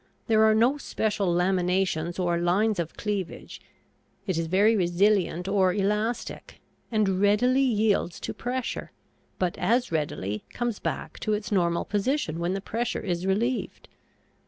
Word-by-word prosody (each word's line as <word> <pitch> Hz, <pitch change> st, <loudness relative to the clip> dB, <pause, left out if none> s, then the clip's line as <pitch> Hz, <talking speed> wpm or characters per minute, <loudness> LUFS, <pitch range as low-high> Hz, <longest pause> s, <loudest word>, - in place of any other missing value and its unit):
There 220 Hz, -2 st, +4 dB
are 220 Hz, 0 st, +5 dB
no 245 Hz, +6 st, +3 dB
special 210 Hz, -6 st, -1 dB
laminations 180 Hz, -1 st, +1 dB
or 175 Hz, -2 st, 0 dB
lines 195 Hz, +4 st, +1 dB
of 170 Hz, -1 st, -4 dB
cleavage; 200 Hz, -5 st, -4 dB, 0.6 s
it 190 Hz, -4 st, -1 dB
is 165 Hz, 0 st, -1 dB
very 205 Hz, +6 st, +4 dB
resilient 180 Hz, -1 st, +2 dB
or 190 Hz, -2 st, +2 dB
elastic, 210 Hz, +4 st, -2 dB, 0.3 s
and 200 Hz, -4 st, +1 dB
readily 245 Hz, +6 st, +3 dB
yields 215 Hz, -8 st, +1 dB
to -, -, -4 dB
pressure, 250 Hz, +1 st, -4 dB, 0.5 s
but 180 Hz, -2 st, -1 dB
as 245 Hz, 0 st, +1 dB
readily 105 Hz, -, -2 dB
comes 240 Hz, -3 st, -3 dB
back -, -, -4 dB
to 215 Hz, -, -1 dB
its 210 Hz, +1 st, -3 dB
normal 170 Hz, -4 st, +1 dB
position 205 Hz, -, -1 dB
when 175 Hz, +2 st, -1 dB
the 195 Hz, -, -3 dB
pressure 230 Hz, +4 st, -2 dB
is 180 Hz, -2 st, -2 dB
relieved. 235 Hz, +6 st, -1 dB
200 Hz, 140 wpm, -26 LUFS, 175-220 Hz, 0.6 s, are